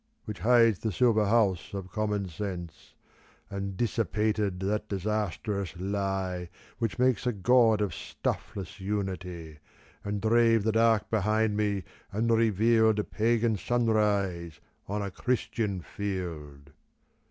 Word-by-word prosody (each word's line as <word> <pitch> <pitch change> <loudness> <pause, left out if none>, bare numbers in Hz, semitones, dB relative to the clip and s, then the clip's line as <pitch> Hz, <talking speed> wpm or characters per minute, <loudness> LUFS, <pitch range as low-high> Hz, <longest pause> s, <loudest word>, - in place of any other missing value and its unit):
Which 105 -4 -6
hides 115 -3 +4
the 110 - -2
silver 110 +1 +3
house 100 -4 +1
of 95 -2 -6
Commonsense, 100 -5 -4 0.6
And 100 -1 -4
dissipated 105 -3 0
that 105 +2 -1
disastrous 100 -2 -2
lie 95 -2 -2 0.3
Which 115 -3 -1
makes 125 -2 +2
a - - +3
god 110 +1 +4
of 105 - -1
stuffless 95 -1 -5
Unity, 90 -5 -4 0.4
And 100 0 -2
drave 115 0 +4
the 110 - +2
dark 115 -1 +2
behind 110 0 +1
me, 105 -2 0 0.3
and 115 +3 0
revealed 110 0 +3
A 105 - +1
Pagan 115 0 +1
sunrise 100 -7 0 0.3
on 105 +1 -2
a 100 - -4
Christian 105 -3 -1
field. 80 -7 -6
105 Hz, 120 wpm, -28 LUFS, 95-110 Hz, 0.6 s, hides